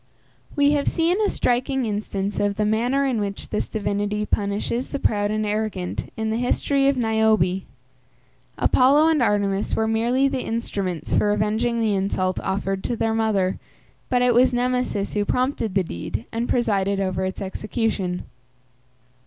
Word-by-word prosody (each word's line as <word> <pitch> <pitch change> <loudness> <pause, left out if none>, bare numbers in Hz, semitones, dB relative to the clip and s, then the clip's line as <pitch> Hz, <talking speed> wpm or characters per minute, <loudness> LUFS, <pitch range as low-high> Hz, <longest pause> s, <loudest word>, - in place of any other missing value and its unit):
We 285 0 +4
have 290 -1 0
seen 345 +5 +1
a 420 - +2
striking 255 +1 0
instance 205 -2 -3
of 205 0 +1
the 210 +1 0
manner 245 +6 +1
in 255 -5 0
which 200 -1 -5
this 210 - -2
divinity 205 0 -1
punishes 210 +5 -1
the - - -2
proud 205 -5 +1
and 215 0 -1
arrogant 210 -4 -3
in 220 0 -1
the 220 - 0
history 275 +3 +1
of 275 -1 +2
Niobe. 220 -5 +2 1.0
Apollo 285 +5 +4
and 315 -4 +2
Artemis 205 -3 +1
were 220 - +1
merely 240 +5 +2
the 270 -2 -2
instruments 200 -7 -3
for 205 - +3
avenging 220 +3 0
the 220 -2 +2
insult 190 -1 0
offered 195 0 -2
to 240 - -1
their 225 0 0
mother; 210 -4 +1 0.5
but 250 -1 +2
it 250 -1 +4
was 250 +2 +4
Nemesis 250 -5 -1
who 210 - +1
prompted 250 -3 -1
the 190 - +3
deed, 105 - -5
and 230 +1 -2
presided 200 -5 +1
over 190 -1 -1
its 190 0 -3
execution. 195 -2 -2
220 Hz, 160 wpm, -23 LUFS, 200-245 Hz, 1.0 s, We